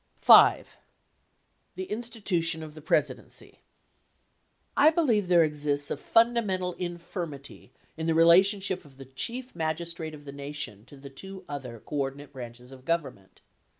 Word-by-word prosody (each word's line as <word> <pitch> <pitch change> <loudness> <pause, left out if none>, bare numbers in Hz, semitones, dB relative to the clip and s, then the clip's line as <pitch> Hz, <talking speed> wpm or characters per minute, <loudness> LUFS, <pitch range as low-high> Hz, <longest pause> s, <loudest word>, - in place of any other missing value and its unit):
V. - - +7 1.1
The 375 - -4
institution 200 -8 -2
of 155 -1 -9
the 155 - -11
Presidency. 155 - -2 1.2
I 295 +2 +7
believe 250 - +1
there 175 -2 +5
exists 145 -2 -1
a - - -1
fundamental 220 -6 +2
infirmity 170 -7 -7 0.3
in 160 0 -3
the 165 - +2
relationship 190 +3 +4
of 135 -3 -18
the 135 - -10
Chief 235 - -4
Magistrate 160 0 -3
of 145 -1 -14
the 140 - -7
Nation 140 -7 -6
to 140 - -14
the 135 0 -11
two 190 +6 -10
other 130 -5 -7
coordinate 140 +2 -4
branches 125 -1 -10
of 130 -1 -13
Government. 145 - -3
160 Hz, 135 wpm, -27 LUFS, 140-190 Hz, 1.2 s, V